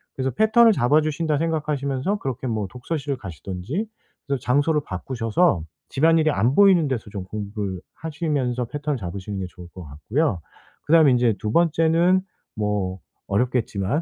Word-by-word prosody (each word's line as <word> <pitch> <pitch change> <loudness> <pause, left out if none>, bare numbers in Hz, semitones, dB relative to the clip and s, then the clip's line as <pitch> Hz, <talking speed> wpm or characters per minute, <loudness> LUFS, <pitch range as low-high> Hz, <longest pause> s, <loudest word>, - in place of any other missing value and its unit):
그래서 130 0 -1
'패턴을 220 - +5
잡아주신다.' 155 +2 +1
생각하시면서 150 +2 -1
그렇게 130 -4 -4
뭐 110 -4 -2
독서실을 140 - -4
가시든지 100 - -5 0.4
그래서 140 -2 -1
장소를 145 +5 +2
바꾸셔서 115 - 0 0.3
집안일이 160 +2 +3
안 125 -2 +1
보이는 190 -5 +6
데서 120 -5 -3
좀 100 -2 -5
공부를 100 -2 -5
하시면서 145 -6 -2
패턴을 145 +3 -3
잡으시는 95 0 -5
게 95 - -3
좋을 90 -1 -12
것 90 - -9
같고요. 90 - -1 0.4
그 150 - +1
다음에 160 -4 +7
인제 120 -3 +3
2 105 - -3
번째는 170 +2 +3 0.3
뭐 105 -3 -2 0.3
어렵겠지만 115 - 0
130 Hz, 370 characters per minute, -23 LUFS, 105-160 Hz, 0.4 s, 다음에